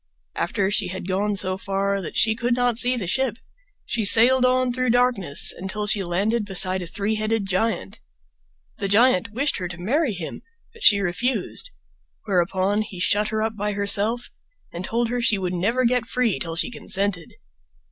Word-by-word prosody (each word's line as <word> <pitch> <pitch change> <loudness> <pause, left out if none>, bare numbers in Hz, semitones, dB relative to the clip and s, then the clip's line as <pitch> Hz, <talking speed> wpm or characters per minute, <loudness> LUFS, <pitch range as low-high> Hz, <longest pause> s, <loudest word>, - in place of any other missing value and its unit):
After 200 -2 -1
she 210 -2 +1
had 185 0 -6
gone 200 +2 -1
so 185 -1 0
far 195 0 -2
that 175 - -7
she 220 0 +3
could 240 +1 -1
not 245 -2 0
see 250 0 +2
the 210 - -3
ship, 235 +5 -1 0.5
she 230 - -2
sailed 240 +5 +5
on 255 -1 +1
through 255 0 -1
darkness 240 - +2
until 190 +3 -4
she 210 -1 +2
landed 200 +6 -1
beside 190 -1 +2
a 175 - -6
three 205 +5 -2
headed 215 -1 -1
giant. 195 +4 -2 0.8
The 200 - -2
giant 225 0 +3
wished 270 +6 -1
her 180 - -4
to 170 -1 -9
marry 245 - 0
him, 175 -4 -7 0.3
but 460 - -17
she 205 - +7
refused; 240 - -2 0.6
whereupon 190 +1 0
he 195 -4 -8
shut 205 +5 +1
her 215 0 -2
up 220 0 -3
by 210 0 -3
herself 205 +4 +2 0.4
and 175 - -6
told 230 +4 -1
her 245 0 -2
she 225 -3 +2
would 185 -2 -3
never 230 +8 0
get 240 -1 +1
free 245 -3 0
until 165 -2 -4
she 170 - +1
consented. 195 -7 -2
210 Hz, 180 wpm, -22 LUFS, 190-240 Hz, 0.8 s, she